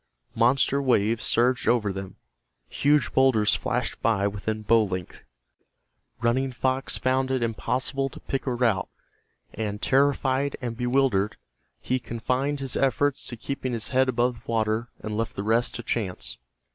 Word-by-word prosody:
Monster 135 Hz, +4 st, +3 dB
waves 115 Hz, -4 st, +2 dB
surged 125 Hz, +2 st, +2 dB
over 105 Hz, -5 st, +2 dB
them, 95 Hz, -1 st, -7 dB, 0.5 s
huge 145 Hz, -, +2 dB
boulders 115 Hz, -6 st, +4 dB
flashed -, -, -2 dB
by 105 Hz, -4 st, +2 dB
within 105 Hz, +2 st, -3 dB
bow 115 Hz, +1 st, +4 dB
length. 90 Hz, -4 st, -5 dB, 1.0 s
Running 130 Hz, +3 st, +1 dB
Fox 130 Hz, +1 st, 0 dB
found 130 Hz, +1 st, +1 dB
it 130 Hz, -2 st, 0 dB
impossible 130 Hz, +4 st, -1 dB
to -, -, -12 dB
pick 135 Hz, 0 st, -4 dB
a 130 Hz, -, +1 dB
route, 115 Hz, -6 st, +1 dB, 0.6 s
and, 105 Hz, -1 st, -3 dB
terrified 135 Hz, +1 st, +2 dB
and 120 Hz, -2 st, -4 dB
bewildered, 125 Hz, -4 st, +1 dB, 0.4 s
he 130 Hz, -, 0 dB
confined 130 Hz, +5 st, -2 dB
his 135 Hz, -2 st, -4 dB
efforts 135 Hz, +1 st, +1 dB
to 120 Hz, -, -7 dB
keeping 130 Hz, +1 st, -4 dB
his 115 Hz, -2 st, -2 dB
head 130 Hz, 0 st, +3 dB
above 125 Hz, 0 st, +1 dB
the 120 Hz, -, -13 dB
surface 110 Hz, +1 st, 0 dB
and 105 Hz, 0 st, -4 dB
left 115 Hz, -1 st, -2 dB
the 100 Hz, -, -3 dB
rest 115 Hz, +3 st, +1 dB
to 120 Hz, -, -5 dB
chance. 100 Hz, -, -2 dB
120 Hz, 150 wpm, -26 LUFS, 110-130 Hz, 1.0 s, boulders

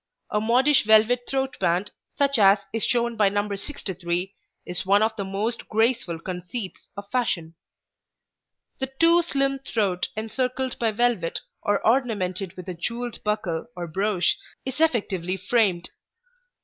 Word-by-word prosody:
A 210 Hz, -, +1 dB
modish 255 Hz, +6 st, +4 dB
velvet 220 Hz, +3 st, +4 dB
throat 270 Hz, -1 st, -1 dB
band, 180 Hz, +2 st, +1 dB, 0.3 s
such 280 Hz, -3 st, +2 dB
as 195 Hz, 0 st, +7 dB, 0.2 s
is 225 Hz, -, 0 dB
shown 235 Hz, -1 st, +1 dB
by 205 Hz, -2 st, +4 dB
No. 205 Hz, +1 st, -1 dB
63, 190 Hz, -, -4 dB, 0.3 s
is 180 Hz, +1 st, -2 dB
one 200 Hz, +2 st, +4 dB
of 220 Hz, 0 st, 0 dB
the 200 Hz, -, -3 dB
most 205 Hz, +5 st, -3 dB
graceful 220 Hz, -6 st, +1 dB
conceits 180 Hz, +4 st, -6 dB
of 200 Hz, 0 st, -7 dB
fashion. 180 Hz, -10 st, -1 dB, 1.3 s
The 265 Hz, -1 st, -2 dB
too 335 Hz, +1 st, +6 dB
slim 275 Hz, -4 st, 0 dB
throat 205 Hz, -9 st, -1 dB
encircled 255 Hz, +4 st, -2 dB
by 230 Hz, -, +2 dB
velvet 220 Hz, -6 st, 0 dB, 0.2 s
or 205 Hz, -1 st, 0 dB
ornamented 200 Hz, -7 st, 0 dB
with 180 Hz, -, -8 dB
a 185 Hz, -, -3 dB
jewelled 235 Hz, +7 st, -4 dB
buckle 210 Hz, -6 st, -1 dB
or 175 Hz, -1 st, -4 dB
brooch 190 Hz, -, +1 dB, 0.3 s
is 265 Hz, +3 st, -4 dB
effectively 195 Hz, -, +1 dB
framed. 190 Hz, -3 st, +1 dB
215 Hz, 140 wpm, -25 LUFS, 185-245 Hz, 1.3 s, as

